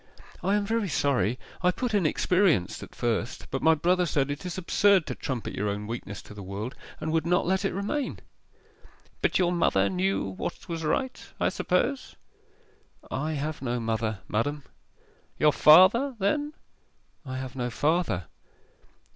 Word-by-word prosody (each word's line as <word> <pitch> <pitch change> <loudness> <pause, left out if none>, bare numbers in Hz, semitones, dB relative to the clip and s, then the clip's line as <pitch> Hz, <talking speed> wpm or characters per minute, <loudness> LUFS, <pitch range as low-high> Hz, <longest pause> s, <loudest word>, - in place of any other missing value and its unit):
'I 195 +3 +2
am 205 -1 +1
very 220 -2 0
sorry: 125 - +1 0.2
I 180 - +4
put 235 +5 -2
"inexperienced" 180 - +2
at - - -11
first, 120 0 -2
but 135 - -2
my 160 0 +5
brother 180 +3 +2
said 145 -2 0
it 145 +5 -5
is 180 - -5
absurd 190 0 +3
to - - -3
trumpet 130 -6 -4
your 105 +1 -1
own 100 +1 -3
weakness 105 -3 -6
to - - -12
the 105 - -9
world, 100 +6 -5 0.3
and 155 - -3
would 160 0 +1
not 180 +2 +2
let 190 +2 +1
it - - 0
remain.' 205 +9 -2 1.0
'But - - +2
your 175 -2 +2
mother 100 - +2
knew 95 +1 0
what 95 - -5
was 165 -2 -4
right, 255 +12 -1 0.2
I - - +2
suppose?' 245 +9 -1 1.0
'I 155 +4 -2
have 150 +1 -3
no 125 -2 -1
mother, 110 -3 -2
madam.' 145 +7 -1 0.7
'Your 150 -1 +4
father, 190 - +6
then?' 290 +10 0 0.7
'I 130 -3 -5
have 130 0 -6
no 125 -2 -2
father. 145 - 0
155 Hz, 160 wpm, -27 LUFS, 115-185 Hz, 1.0 s, father